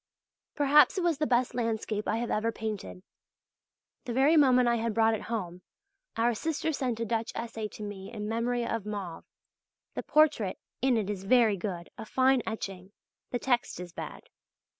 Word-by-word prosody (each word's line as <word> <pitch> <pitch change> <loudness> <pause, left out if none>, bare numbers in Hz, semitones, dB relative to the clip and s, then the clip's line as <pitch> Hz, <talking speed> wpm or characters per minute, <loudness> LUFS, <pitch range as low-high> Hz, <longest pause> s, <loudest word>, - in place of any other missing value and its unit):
Perhaps 295 +5 +5
it 370 - 0
was 335 -5 +1
the 305 - +1
best 245 +1 +2
landscape 225 -3 -2
I 215 - +1
have 235 0 -2
ever 220 +2 +1
painted. 215 -4 -5 1.0
The 240 - -3
very 275 +6 +4
moment 255 -5 +5
I 235 0 +3
had 225 -1 -2
brought 225 0 +4
it 220 - -2
home, 180 -6 -3 0.6
our 235 +1 +3
sister 320 +5 -2
sent 250 -5 -2
a 230 - -1
Dutch 230 +1 -1
essay 225 -2 -4
to 210 - -10
me 195 -2 -7
in 210 -3 -5
memory 235 +2 0
of 230 -3 -2
Mauve 200 -5 -6 0.7
(the - - -3
portrait 300 -11 +3 0.2
in 255 -2 +3
it 210 -3 -1
is 200 -2 -4
very 230 -1 +5
good 175 -2 -5
a 220 - -5
fine 260 +1 +3
etching 195 -3 -5 0.4
the 245 - -1
text 245 -6 0
is 175 -1 -8
bad). - - -7
230 Hz, 180 wpm, -29 LUFS, 210-250 Hz, 1.0 s, Perhaps